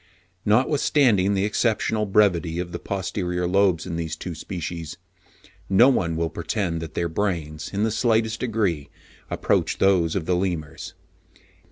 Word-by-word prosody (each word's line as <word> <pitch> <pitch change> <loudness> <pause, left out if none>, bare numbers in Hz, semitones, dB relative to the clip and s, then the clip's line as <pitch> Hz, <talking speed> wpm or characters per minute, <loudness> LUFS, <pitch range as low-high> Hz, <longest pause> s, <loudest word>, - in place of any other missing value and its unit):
Notwithstanding 115 -3 +3
the 95 +1 +1
exceptional 110 0 0
brevity 90 -5 +2
of 90 0 -4
the 85 - -5
posterior 90 -1 -2
lobes 95 -2 +2
in 85 -3 -4
these 80 -1 -3
two 90 - -6
species, 85 -1 -6 0.7
no 115 +7 +6
one 85 -11 +1
will 80 0 -1
pretend 85 -1 -2
that 80 -1 -8
their 85 - 0
brains, 80 -4 -3
in 100 +1 -1
the 110 - +1
slightest 110 -1 +1
degree, 105 - -1 0.4
approach - - 0
those 90 -4 +3
of 90 -5 -1
the 90 - +1
Lemurs. 90 -4 -3
95 Hz, 145 wpm, -24 LUFS, 85-105 Hz, 0.7 s, no